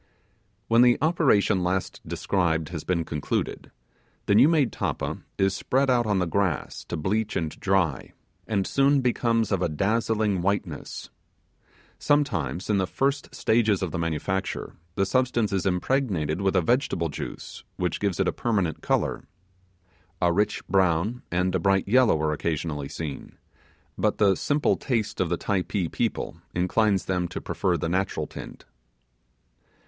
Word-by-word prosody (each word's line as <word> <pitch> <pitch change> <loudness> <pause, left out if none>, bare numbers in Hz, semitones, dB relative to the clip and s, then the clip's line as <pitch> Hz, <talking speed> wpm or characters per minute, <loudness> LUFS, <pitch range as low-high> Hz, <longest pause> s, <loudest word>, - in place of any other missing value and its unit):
When 115 +1 +5
the 125 -1 +6
operation 135 - +3
last 90 +1 -2
described 80 -5 0
has 80 -3 -5
been 85 -3 -1
concluded, 75 -2 -3 0.6
the - - +2
new 120 +9 +7
made 150 -8 +3
tappa - - -3 0.2
is 95 0 +2
spread 135 +5 +1
out 120 -2 +2
on 105 -2 +2
the 90 - +1
grass 90 -2 -1
to 85 - -4
bleach 105 +7 -1
and 80 -2 -1
dry, 95 -9 0 0.3
and 100 -3 0
soon 140 0 +3
becomes 115 -3 +1
of 95 -3 +1
a 85 - +1
dazzling 105 +3 0
whiteness. 95 -5 -3 0.9
Sometimes, 95 - 0
in 105 -2 +2
the 95 - 0
first 140 +8 -1
stages 110 -4 +2
of 90 - -2
the 85 - -3
manufacture, 85 +4 -2 0.2
the 95 - +2
substance 120 -1 +1
is 95 0 0
impregnated 90 - 0
with 95 0 +1
a 90 - +4
vegetable 95 - +1
juice, - - -7
which 90 -2 -2
gives 100 -3 -1
it 95 - +2
a - - +1
permanent 100 -9 -1
colour. - - 0 0.9
A 85 -1 +2
rich 105 +4 0
brown 95 +5 +1
and 90 +1 +1
a 95 - +1
bright 95 +2 +2
yellow 120 -6 +4
are 75 -1 +1
occasionally 75 -2 -3
seen, 75 -4 -6 0.6
but - - +1
the 100 -2 +4
simple 145 +9 +1
taste 115 -8 -1
of 90 - 0
the 85 - 0
Typee 95 -2 -1
people - - -2 0.2
inclines 95 +3 +2
them 90 -2 0
to 90 - -6
prefer 85 +1 -1
the 80 - -2
natural 95 +3 -1
tint. - - -10
95 Hz, 155 wpm, -26 LUFS, 85-115 Hz, 0.9 s, new